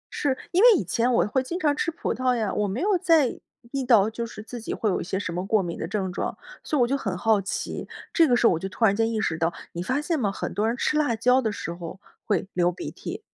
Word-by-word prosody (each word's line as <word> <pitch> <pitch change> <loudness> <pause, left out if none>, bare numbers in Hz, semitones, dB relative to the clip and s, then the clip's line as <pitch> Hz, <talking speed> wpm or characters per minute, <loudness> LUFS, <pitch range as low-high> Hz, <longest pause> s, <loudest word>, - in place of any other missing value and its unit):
是， 270 -3 0
因 365 +3 +3
为 485 0 +9
以 - - -1
前 240 +1 +1
我 235 - +3
会 260 +5 0
经 335 +8 -4
常 295 -4 +2
吃 335 - -1
葡 335 - -3
萄 255 -1 +1
呀。 220 -4 -1
我 210 - 0
没 200 +5 -3
有 390 -2 +2
在 325 -8 +3 0.3
意 275 -1 -1
到， 225 -5 +5
就 235 +1 -4
是 215 -2 -9
自 235 +1 -8
己 - - -5
会 220 - -1
有 - - -1
一 - - -3
些 190 +2 -3
什 190 -3 -3
么 180 +1 -2
过 215 -2 +3
敏 170 -1 -4
的 - - -4
症 190 -3 -2
状， - - -3 0.3
所 300 - -1
以 - - +3
我 240 - +4
就 275 - +1
很 195 -9 -3
好 215 +1 +3
奇， 195 - -4 0.3
这 330 - +5
个 245 - +4
时 240 - +2
候 230 - +6
我 160 - -1
就 190 - -4
突 225 +4 +1
然 200 - +4
间 225 +1 +1
意 220 - -1
识 160 -7 -1
到 165 +2 +1 0.2
你 170 - -5
发 255 +10 0
现 320 +1 -1
吗？ 205 -5 +1
很 - - -5
多 210 +2 0
人 235 +2 -1
吃 300 - +1
辣 290 -6 +2
椒 250 +4 +3
的 220 -3 -1
时 170 -4 -5
候， 170 +2 -8 0.3
会 205 -2 0
流 175 0 +2
鼻 180 - -7
涕。 - - -7
230 Hz, 315 characters per minute, -25 LUFS, 195-270 Hz, 0.3 s, 为